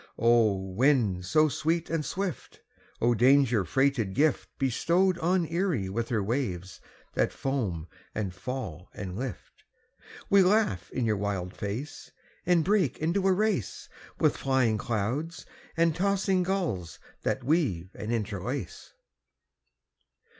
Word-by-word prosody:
O! 115 -3 +4
wind 95 0 +1
so 155 - +4
sweet 165 +3 -1
and 165 -2 -1
swift, 190 +1 -4 0.4
O! 120 +1 +4
danger 125 -2 +4
freighted 120 - +1
gift 150 +1 +2
Bestowed 170 +8 +2
on 175 +1 +2
Erie 165 - -1
with 115 +4 -3
her 110 -4 0
waves 100 -6 -3 0.3
that - - +1
foam 105 - -2 0.3
and 100 -4 -2
fall 90 - -6
and 95 -3 -5
lift, 125 -3 -7 0.6
We 200 0 +6
laugh 185 - +2
in 125 - -2
your 110 -2 +1
wild 100 -2 -3
face, 115 +9 -5 0.4
And 175 -3 +4
break 190 - +2
into 180 +5 0
a - - +5
race 195 - -1 0.3
With - - +3
flying 130 -5 +1
clouds 120 +11 -2 0.3
and 165 -1 +3
tossing 195 0 +1
gulls 170 - -2 0.2
that 135 - -1
weave 120 - 0
and 105 +2 -5
interlace. 110 -4 -4
130 Hz, 125 wpm, -28 LUFS, 100-165 Hz, 0.6 s, We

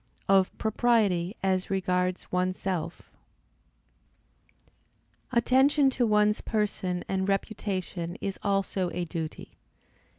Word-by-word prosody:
Of 195 -1 +3
propriety 215 -5 +1
as 190 -1 +1
regards 180 -1 -1
one's 185 +1 0
self. 185 -5 -3 2.3
Attention 265 +3 +4
to 245 -2 +1
one's 210 0 +3
person 195 -5 -1
and 190 0 -1
reputation 195 -3 -2
is 195 -1 -4
also 195 -2 0
a 175 0 -1
duty. 160 -2 -6
195 Hz, 95 wpm, -28 LUFS, 180-210 Hz, 2.3 s, Attention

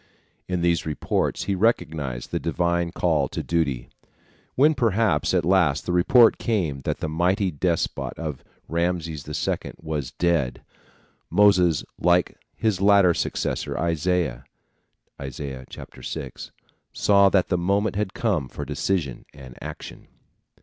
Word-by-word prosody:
In 90 -1 -1
these 85 -1 +2
reports 75 -3 -1
he 100 - -1
recognized 80 - -1
the - - -1
divine 85 +1 0
call 80 -6 +1
to - - -5
duty. 70 -8 -1 0.7
When 150 +4 +5
perhaps 110 - +1
at 90 -4 +1
last 85 -5 +2
the - - -2
report 115 +7 +5
came 85 - -1
that - - -2
the - - -1
mighty 90 +4 +1
despot 85 +2 -1 0.5
Ramses 80 -3 -2
II - - -2
was 75 -5 -4
dead, 80 -8 0 0.7
Moses 90 -6 +4 0.2
like 90 +1 +2 0.2
his 110 -4 0
later 100 -3 +5
successor - - -2
Isaiah 85 +1 0 0.7
(Is. 65 -2 -7 0.7
6) 65 - -7 0.4
saw 100 -1 +4
that 95 -2 +2
the 90 - +2
moment 100 +4 +1
had 105 -1 -2
come 95 - 0
for 75 - -6
decision 75 -1 -2
and 65 -2 -12
action. - - -9
85 Hz, 125 wpm, -24 LUFS, 75-95 Hz, 0.7 s, When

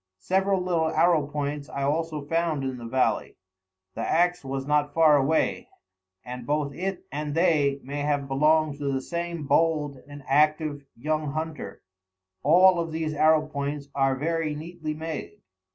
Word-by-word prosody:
Several 190 - +1
little 170 -3 0
arrow 160 -3 +3
points 145 0 -4
I 140 - -4
also 155 +1 -1
found 165 -2 0
in 130 -2 -3
the 115 - -7
valley. 130 +2 0 0.6
The 115 - -5
axe 175 +5 +1
was 135 0 -4
not 145 0 +1
far 160 -2 +6
away, 145 +3 +1 0.6
and 125 -1 -7
both 145 -1 0
it 190 +4 -4
and 150 +1 -3
they 150 -5 +2
may 140 +3 -5
have 145 -1 0
belonged 150 +1 +2
to 140 -1 -1
the 135 - 0
same 170 -1 -4
bold 150 -3 +1
and 145 -1 -10
active 150 0 +2
young 155 +2 -2
hunter. 155 -9 -5 0.6
All 180 +4 +6
of 165 -1 -2
these 160 -1 -2
arrow 155 +1 +4
points 140 -1 -4
are 135 -1 +2
very 160 +2 -1
neatly 155 0 -6
made. 160 0 -6
150 Hz, 155 wpm, -26 LUFS, 140-165 Hz, 0.6 s, far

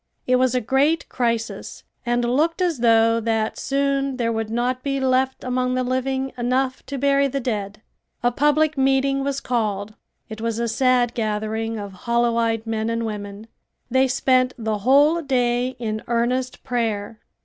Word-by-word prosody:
It 255 0 +3
was 255 -1 +2
a 250 - +2
great 280 +8 +1
crisis 230 -2 -3 0.2
and 240 0 +1
looked 305 +9 +1
as 345 -7 0
though 230 -1 +4
that 225 -1 -1
soon 275 -1 0
there 230 -2 0
would 225 -1 -2
not 245 +3 -1
be 275 0 -1
left 265 0 +1
among 250 0 0
the 255 - 0
living 265 +1 -1
enough 255 +2 0
to 280 - -4
bury 280 +1 +3
the 275 +1 -2
dead. 215 -4 -4 0.4
A 245 - +3
public 295 +2 +2
meeting 270 +1 +2
was 275 0 -1
called. 215 -5 -2 0.3
It 220 -1 -8
was 230 -1 -2
a 235 0 -1
sad 245 0 +2
gathering 220 0 -2
of 200 -2 -6 0.2
hollow 235 0 +2
eyed 225 -1 0
men 220 0 -2
and 230 0 -1
women. 205 -1 -6 0.5
They 260 +1 +4
spent 255 -1 +2
the 220 -2 -2
whole 285 +9 +4
day 250 -2 0
in 215 -2 -3
earnest 250 +2 -1
prayer. 225 -3 -2
245 Hz, 165 wpm, -22 LUFS, 225-265 Hz, 0.5 s, though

